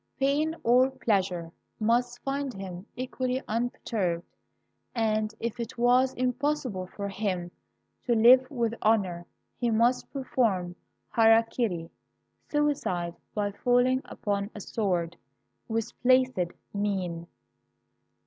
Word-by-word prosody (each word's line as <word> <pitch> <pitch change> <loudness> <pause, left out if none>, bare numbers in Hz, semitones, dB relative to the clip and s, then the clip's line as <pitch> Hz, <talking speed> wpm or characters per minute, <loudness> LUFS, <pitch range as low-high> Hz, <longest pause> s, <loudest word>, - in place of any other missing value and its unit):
Pain 290 +4 +1
or 250 +3 +5
pleasure 190 -10 -1 0.3
must 240 +2 +1
find 275 -1 -2
him 190 0 -7
equally 255 0 -2
unperturbed, 215 -6 -1 0.7
and 215 -1 0
if 235 +1 -3
it 235 0 -5
was 250 +2 +4
impossible 255 -6 -1
for 200 +2 -5
him 190 -3 -2 0.6
to 240 - +3
live 255 +3 +7
with 235 -5 -1
honor 190 -6 +1 0.3
he 240 - +1
must 235 +3 +2
perform 220 -10 0 0.4
hara 225 0 +6
kiri 190 -8 -2 0.6
(suicide 275 - 0 0.2
by 205 -1 0
falling 245 +4 +2
upon 200 -1 -2
a - - -6
sword) 180 -5 -1 0.5
with 225 0 -2
placid 255 -8 +3 0.2
mien. 185 -5 -2
225 Hz, 110 wpm, -28 LUFS, 195-255 Hz, 0.7 s, live